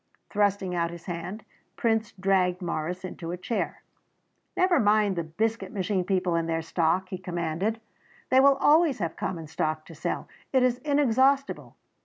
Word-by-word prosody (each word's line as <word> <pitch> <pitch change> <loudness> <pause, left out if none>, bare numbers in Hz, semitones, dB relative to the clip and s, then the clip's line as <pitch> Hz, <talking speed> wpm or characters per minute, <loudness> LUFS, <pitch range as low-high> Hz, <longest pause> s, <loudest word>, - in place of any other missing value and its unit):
Thrusting 200 -3 +1
out 170 -1 0
his 170 0 -10
hand, 180 +4 -5 0.3
Prince 225 -2 0
dragged 185 -2 +1
Morris 175 +1 -3
into 170 -2 -7
a 175 - -3
chair. 185 +6 -3 0.7
"Never 365 -1 +4
mind 210 -2 +3
the 170 - -1
Biscuit 220 +11 -2
Machine 195 -3 -1
people 185 -2 +1
and 165 0 0
their 165 0 -1
stock," 170 +3 0
he 185 - -5
commanded; 175 +4 -2 0.5
"they 260 - +6
will 275 +1 +6
always 300 -2 +4
have 170 -6 -3
common 165 -3 -4
stock 155 0 -2
to 165 - -12
sell. 160 - -3 0.2
It 260 -2 +4
is 250 -1 +2
inexhaustible. 275 -1 +2
190 Hz, 160 wpm, -27 LUFS, 170-225 Hz, 0.7 s, they